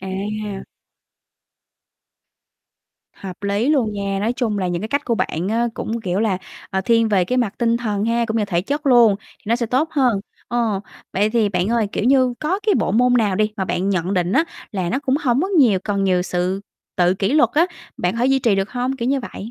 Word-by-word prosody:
À! 200 +1 -4 2.5
Hợp 190 0 -9
lý 200 +6 0
luôn 240 -8 +2
nha, 200 -1 -2
nói 225 +3 0
chung 230 -5 -1
là, 185 -2 -1
những 175 +2 -2
cái 220 - -4
cách 285 +1 -1
của 235 - 0
bạn 180 -3 -2
á, 235 +2 +1
cũng, 230 +1 -3
kiểu 190 -1 -1
là, 200 -5 +1 0.3
ờ, 190 - 0
thiên 230 +3 +2
về 190 -4 +2
cái 250 +7 0
mặt 230 -4 0
tinh 235 -1 +2
thần 210 -3 -2
ha, 235 +1 +1
cũng 220 - -2
như 215 - +1
thể 175 -4 0
chất 290 +6 -3
luôn, 240 -5 +6
thì - - -24
nó 230 +2 +2
sẽ 235 -2 -2
tốt 270 +7 +1
hơn. 250 -9 +2 0.3
Ồ, 230 -5 0 0.3
vậy 205 +3 +1
thì 225 -3 +2
bạn 180 +1 -1
ơi, 230 -2 +1
kiểu - - -2
như, 255 -1 +3
có 335 +6 0
cái 415 - +4
bộ - - 0
môn 245 +2 +3
nào 210 -6 +2
đi 215 +1 +1
mà 190 - -1
bạn 185 +1 -1
nhận 185 0 0
định 180 0 0
á, 320 - +3 0.3
là 185 -4 -2
nó 265 - 0
cũng 275 -1 0
hổng 255 0 +2
có 380 - -1
nhiều 265 - +4
cần 200 -2 0
nhiều 180 -1 +2
sự 180 +2 -1 0.4
tự 180 0 +3
kỷ 195 +6 -1
luật 300 - +4
á, 335 +4 +4 0.3
bạn 180 +5 -1
thể 245 +2 +2
duy 270 0 +3
trì 230 -5 +2
được 195 +1 -1
hông, 250 +2 -2
kiểu 235 0 -2
như 275 0 +1
vậy? 225 -2 -8
220 Hz, 230 wpm, -20 LUFS, 195-245 Hz, 2.5 s, luôn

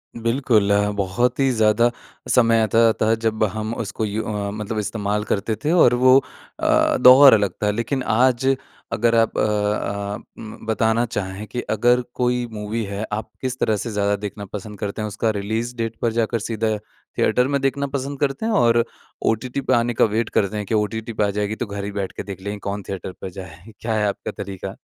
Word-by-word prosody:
बिल्कुल। 115 -3 +1
अ, 105 0 +3
बहुत 100 +7 0
ही 135 -1 +3
ज़्यादा 110 +1 +3 0.4
समय 115 -2 +4
आता-जाता 110 +1 +3
था 110 - +3
जब 110 0 0
हम 110 +1 -3
उसको 110 0 -3
यू 105 +2 -2
अ, 105 -2 -3
मतलब 105 +1 -4
इस्तेमाल 105 0 -2
करते 105 +1 -1
थे 155 - +2
और 160 -9 +5
वो 130 +1 +6 0.4
अ, - - +3
दौर 130 +1 +9
अलग 100 -3 +3
था। 105 - +3
लेकिन 115 +5 -2
आज 130 +3 +3 0.4
अगर 115 +1 +2
आप 115 -1 +2
अ - - +2
अ, 105 -1 -1 0.2
अम 110 0 -10
बताना 110 +1 +1
चाहें 100 -2 -4
कि 120 +5 -4
अगर 120 +3 +3
कोई 125 0 0
मूवी 110 +1 -3
है, 100 +1 -4
आप 105 0 -3
किस 130 -1 -3
तरह 110 - +2
से 115 +3 -4
ज़्यादा 100 -1 +1
देखना 100 0 -6
पसंद 105 0 -7
करते 105 +1 -4
हैं? 105 - -2
उसका 110 +2 -1
रिलीज़ 110 +4 -3
डेट 115 -1 -2
पर 115 - +1
जाकर 115 0 0
सीधा 110 0 -1 0.4
थिएटर 125 +1 +3
में 140 0 0
देखना 140 +1 0
पसंद 140 0 -4
करते 140 +9 -1
हैं, 225 - 0
और 115 - +4 0.4
ओटीटी 125 +4 0
पे 130 - 0
आने 120 0 +2
का - - +4
वेट 110 +2 -1
करते 100 +1 0
हैं 105 - -3
कि 110 - -4
ओटीटी 110 +2 -2
पे 105 - 0
आ - - -1
जाएगी 105 +1 -2
तो 120 - -3
घर 100 -1 -6
ही 100 - -4
बैठ 100 -1 -3
के - - -3
देख 95 -1 -8
लेंगे, 100 +1 -5
कौन 100 0 -4
थिएटर 95 -1 -5
पर 95 - -5
जाए, 90 +3 -11
क्या 115 -1 -2
है 105 -1 +1
आपका 100 - -3
तरीका? 95 -1 -7
110 Hz, 205 wpm, -22 LUFS, 105-120 Hz, 0.4 s, दौर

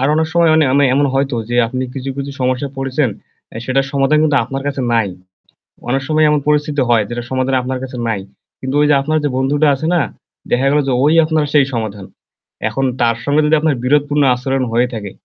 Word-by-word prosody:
আর 135 - +2
অনেক 160 +1 +1
সময় 170 -1 +3
অনি 160 -1 +4
আমি 140 +1 +4
এমন 145 +1 +3
হয়তো 135 -1 0
যে 120 - 0
আপনি 130 +3 -3
কিছু, 135 0 -5
কিছু, 140 0 -4
সমস্যায় 130 +2 -1
পড়েছেন, 135 +1 0 0.5
আ - - -7
সেটার 135 +2 0
সমাধান 140 +2 +2
কিন্তু 150 -2 +2
আপনার 135 +3 -5
কাছে 140 -1 -2
নাই। 115 -3 +2 0.8
অনেক 135 +2 +1
সময় 155 0 +3
এমন 150 0 +2
পরিস্থিতি 150 -1 +1
হয় 115 -3 +4
যেটার 120 0 -5
সমাধান 130 0 0
আপনার 130 +1 -4
কাছে 130 -1 -7
নাই। 110 -4 -1 0.4
কিন্তু 130 +1 -4
ঐ - - +4
যে - - +5
আপনার 155 +3 0
যে 145 - +1
বন্ধুটা 145 +3 +1
আছে 140 +4 -5
না, 170 - +3 0.5
দেখা 130 +3 +2
গেল 150 - +3
যে 135 - +1
ওই 150 +2 +4
আপনার 155 -1 0
সেই 145 -2 +5
সমাধান। 105 -4 -4 0.6
এখন 135 - -3 0.2
তার 115 -1 +2
সঙ্গে 145 +2 +2
যদি 150 +1 +3
আপনার 155 -2 +1
বিরোধপূর্ণ 145 +2 +2
আচরণ 130 +1 -2
হয়ে 120 +2 +2
থাকে। 105 -4 -6
135 Hz, 215 wpm, -16 LUFS, 125-150 Hz, 0.8 s, যে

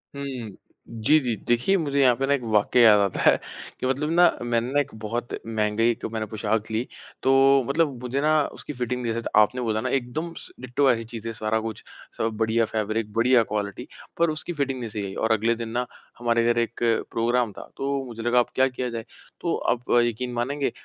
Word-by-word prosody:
हुँ। 130 -7 -6 0.3
जी, 115 +7 +3
जी। 120 -5 -1
देखिए, 120 +11 +3
मुझे 140 -5 -1
यहाँ 125 -2 +5
पे 135 - -1
ना 140 - +3
एक 140 - 0
वाक़या 105 +4 +4
याद 105 -2 +7
आता 100 -2 0
है, - - +5 0.4
कि - - -3
मतलब 140 +4 0
ना, 175 +1 +5 0.2
मैंने 120 +1 0
ना 145 - +4
एक 145 0 -2
बहुत 120 +3 -4
महँगी 110 0 0
1 120 - -2
मैंने 110 -1 -2
पोशाक 110 +1 -2
ली। 110 +2 0 0.4
तो, 135 0 +5
मतलब 150 0 +1
मुझे 125 +3 -2
ना 155 - +2 0.3
उसकी 150 - -7
फ़िटिंग 125 0 -3
जैसे 115 0 -1
तो - - -4
आपने 125 +4 +3
बोला 110 -2 -1
ना 130 - -2
एकदम 135 +7 -2
स - - -8
डिट्टो 130 +2 +1
ऐसी 115 -1 -1
चीज़ें 115 0 -6
सारा 110 0 -1
कुछ, 110 -1 -6 0.3
सब 115 - 0
बढ़िया 115 +1 +2
फ़ैब्रिक, 110 0 -2
बढ़िया 120 +1 +4
क्वालिटी 100 -2 -3 0.3
पर 170 0 +3
उसकी 155 +3 -4
फ़िटिंग 135 -4 -2
नहीं 120 -2 -5
सही 105 -1 -4
आई। 95 - -6
और 110 - 0
अगले 115 +2 +2
दिन 115 -1 -5
ना, 125 +2 -1 0.3
हमारे 115 -1 +2
घर 120 - 0
1 120 0 -2 0.3
प्रोग्राम 120 0 +1
था, - - -11
तो 140 0 -1
मुझे 115 -2 -7
लगा 120 +1 +3
अब 120 - +1
क्या 130 0 +4
किया 125 -1 -4
जाए? 115 -1 -5 0.4
तो 170 - 0 0.2
आप 125 0 -8 0.2
यक़ीन 120 +2 -3
मानेंगे, 140 +4 -1
120 Hz, 215 wpm, -25 LUFS, 110-135 Hz, 0.4 s, याद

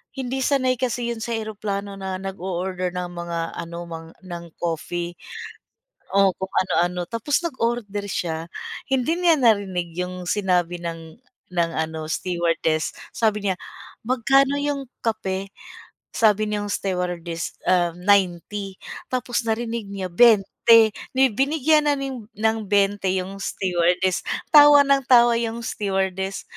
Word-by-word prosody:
hindi 265 0 -3
sanay 255 -2 +1
kasi 240 -1 -1
'yon 235 - -5
sa 235 +1 -3
eroplano 205 -2 -4
na 190 -1 -3
nag-o-order 185 -1 -3
ng 180 -1 -3
mga 170 -1 -4 0.2
ano 170 0 -6
mga 165 0 -8
ng 170 -2 -7 0.2
coffee. 170 +1 -3 0.9
Oh, 195 0 +4
kung 190 - -3
ano-ano, 180 -1 +1
tapos 230 +8 0
nag-order 230 -8 -2
siya, 165 -2 -3 0.4
hindi 265 +4 +1
niya 340 -3 +4
narinig 195 -8 +1
'yung 180 0 -4
sinabi 180 -4 +1
ng 165 +4 -7 0.3
ng 170 -1 +1
ano 160 0 -3
stewardess, 165 -2 0 0.2
sabi 210 -2 0
niya, 190 - +1 0.5
"magkano 270 +3 +3
'yong 285 -1 -2 0.2
kape?" 195 -4 -2 0.6
sabi 215 -2 +3
niyang 210 -1 -2
stewardess, 180 -3 -3
um, 175 -2 +2
90 195 0 +1 0.3
tapos 245 -2 -2
narinig 225 -1 -2
niya 195 -2 -5
20 225 +2 +5 0.2
di 265 -2 +4
binigyan 300 +5 +2
na 290 - +3
ni 275 -1 -4
ng 220 -2 -2
20 200 0 +2
'yung 190 +1 -2
stewardess, 180 -1 +1 0.3
tawa 290 -1 +9
ng 275 -1 +3
tawa 240 -2 +6
'yung 230 0 -3
stewardess. 190 -2 -2
200 Hz, 125 wpm, -23 LUFS, 180-235 Hz, 0.9 s, tawa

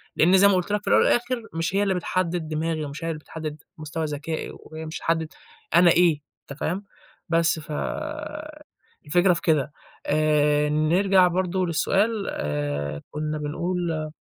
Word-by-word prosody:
لإن 180 +4 +5
زي 200 +2 +7
ما 200 - +4
قُلت 185 +2 -1
لك 210 0 +1
في - - -15
الأول - - +5
والآخر 240 0 +1
مش 165 +3 -2
هي 200 - +3
اللي 195 -1 +1
بتحدِّد 175 -2 -1
دماغي، 155 0 -2
ومش 145 +3 -7
هي - - -2
اللي 160 -2 -3
بتحدِّد 155 -1 -7
مستوى 155 +1 -4
ذكائي، 150 +2 -4
وهي 160 0 -9
مش 155 - -6
هتحدِّد 160 -1 -1 0.4
أنا 175 0 +7
إيه 165 -4 +4 0.3
أنت 140 - -8
فاهم، 190 +5 -2 0.4
بس 165 -1 +2
ف 155 0 -10 1.3
الفكرة 175 +4 +4
في - - -4
كده، 150 -3 +1 0.3
آآ 150 -1 +2
نرجع 180 +5 +4
برضه 185 +1 0
للسؤال 200 +6 +1
آآ 75 0 -3
كُنّا 155 0 -3
بنقول 160 +1 -2
160 Hz, 160 wpm, -24 LUFS, 150-180 Hz, 1.3 s, زي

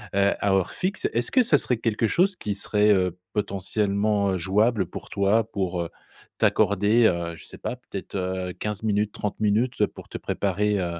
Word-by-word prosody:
heu, 100 0 +3
à 100 - +1
heure 95 -2 +1
fixe. 190 +2 -1
Est-ce 120 +1 0
que 255 -1 +5
ce 230 - +4
serait 125 - 0
quelque 115 -1 0
chose 185 - +2
qui 105 - -3
serait, 105 +1 +2
heu, 90 -2 0 0.2
potentiellement, 100 0 0
heu, - - 0
jouable 100 +3 +2
pour - - -9
toi, 100 +3 +2
pour, 95 -4 -2
heu, 85 - -4 0.5
t'accorder, 105 +4 +3
heu, 85 -1 -1
je - - -12
sais - - -11
pas, - - -4
peut-être, - - -8
heu 95 -1 -2
15 105 0 -4
minutes, 105 -1 0
30 105 0 -4
minutes 110 +4 +2
pour - - -13
te - - -5
préparer, 100 +1 0
heu, 85 -1 -3
100 Hz, 190 wpm, -25 LUFS, 95-110 Hz, 0.5 s, que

